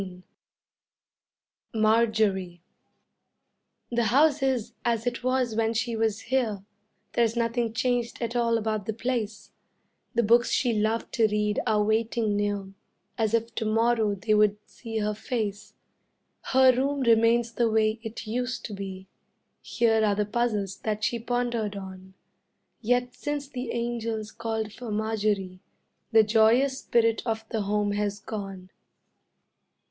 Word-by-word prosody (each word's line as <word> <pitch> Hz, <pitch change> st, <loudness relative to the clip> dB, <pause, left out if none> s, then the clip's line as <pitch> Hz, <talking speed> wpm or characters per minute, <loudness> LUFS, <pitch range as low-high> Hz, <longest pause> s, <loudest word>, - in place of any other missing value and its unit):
] -, -, -60 dB
MARJORIE 215 Hz, -5 st, +2 dB, 1.3 s
The 235 Hz, -1 st, +1 dB
house 285 Hz, +5 st, +4 dB
is 260 Hz, -5 st, 0 dB
as 230 Hz, -1 st, 0 dB
it 245 Hz, 0 st, -2 dB
was 255 Hz, -2 st, +1 dB
when 225 Hz, 0 st, +1 dB
she 230 Hz, +1 st, -1 dB
was 220 Hz, -1 st, 0 dB
here; 225 Hz, -6 st, -1 dB, 0.5 s
There's 230 Hz, -1 st, +2 dB
nothing 230 Hz, 0 st, 0 dB
changed 245 Hz, 0 st, -1 dB
at 235 Hz, 0 st, -3 dB
all 230 Hz, -1 st, +2 dB
about 215 Hz, -2 st, -2 dB
the 220 Hz, -, -1 dB
place; 230 Hz, -3 st, -3 dB, 0.6 s
The 235 Hz, -, +3 dB
books 235 Hz, +3 st, +4 dB
she 245 Hz, -3 st, +1 dB
loved 220 Hz, +2 st, -1 dB
to 225 Hz, -2 st, +4 dB
read 210 Hz, 0 st, 0 dB
are 210 Hz, -1 st, +3 dB
waiting 220 Hz, 0 st, +1 dB
near 205 Hz, -1 st, -2 dB, 0.4 s
As 225 Hz, -2 st, +1 dB
if 230 Hz, 0 st, -2 dB
to 225 Hz, -, -3 dB
morrow 225 Hz, -1 st, +2 dB
they 215 Hz, +3 st, 0 dB
would 210 Hz, -1 st, +4 dB
see 225 Hz, -2 st, -7 dB
her 210 Hz, -1 st, 0 dB
face; 210 Hz, -2 st, -4 dB, 0.7 s
Her 260 Hz, -1 st, +5 dB
room 275 Hz, +2 st, 0 dB
remains 230 Hz, 0 st, +4 dB
the 230 Hz, 0 st, +1 dB
way 220 Hz, 0 st, +2 dB
it 225 Hz, +1 st, -7 dB
used 245 Hz, +3 st, -3 dB
to 215 Hz, -, -6 dB
be, 190 Hz, -1 st, -7 dB, 0.5 s
Here 225 Hz, -2 st, +2 dB
are 205 Hz, -1 st, +2 dB
the 210 Hz, 0 st, 0 dB
puzzles 210 Hz, -3 st, -1 dB
that 215 Hz, -1 st, -3 dB
she 235 Hz, +2 st, 0 dB
pondered 240 Hz, -3 st, -1 dB
on: 190 Hz, -1 st, -9 dB, 0.7 s
Yet 245 Hz, +2 st, +1 dB
since 290 Hz, 0 st, -4 dB
the 255 Hz, -3 st, -5 dB
angels 230 Hz, -2 st, -3 dB
called 220 Hz, -2 st, -3 dB
for 245 Hz, -1 st, -8 dB
Marjorie 210 Hz, -3 st, -1 dB, 0.5 s
The 225 Hz, -1 st, +7 dB
joyous 230 Hz, +5 st, +3 dB
spirit 230 Hz, -2 st, +2 dB
of 225 Hz, -2 st, -2 dB
the 220 Hz, -, -1 dB
home 205 Hz, 0 st, 0 dB
has 205 Hz, 0 st, -1 dB
gone. 195 Hz, -3 st, -7 dB
225 Hz, 140 wpm, -27 LUFS, 210-235 Hz, 1.3 s, The